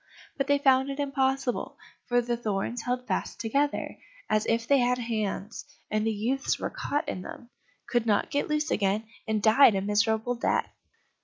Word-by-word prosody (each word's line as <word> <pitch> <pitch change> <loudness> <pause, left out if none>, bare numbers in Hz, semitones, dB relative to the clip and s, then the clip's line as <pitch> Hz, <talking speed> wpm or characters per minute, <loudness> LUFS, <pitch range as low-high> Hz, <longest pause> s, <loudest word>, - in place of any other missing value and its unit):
But 275 -1 -1
they 285 0 +4
found 265 -1 +3
it 275 +1 -5
impossible, 270 -3 -1 0.3
for 245 -1 +3
the 240 0 -1
thorns 225 +1 -2
held 250 +1 -2
fast - - -3
together, 280 +6 -1 0.3
as 215 0 +2
if 230 0 0
they 280 -1 +5
had 250 0 +2
hands, 220 -3 -3 0.3
and 215 +1 +1
the - - +2
youths 240 +6 -1
were - - -4
caught 290 +1 -2
in 185 - -3
them, 235 +6 -10 0.4
could 235 -1 0
not 210 +8 +1
get 285 -2 0
loose 300 0 0
again, 205 +1 +1 0.2
and 215 -1 0
died 225 0 +6
a 190 - 0
miserable 215 +4 +1
death. 235 - -1
240 Hz, 175 wpm, -27 LUFS, 215-270 Hz, 0.4 s, died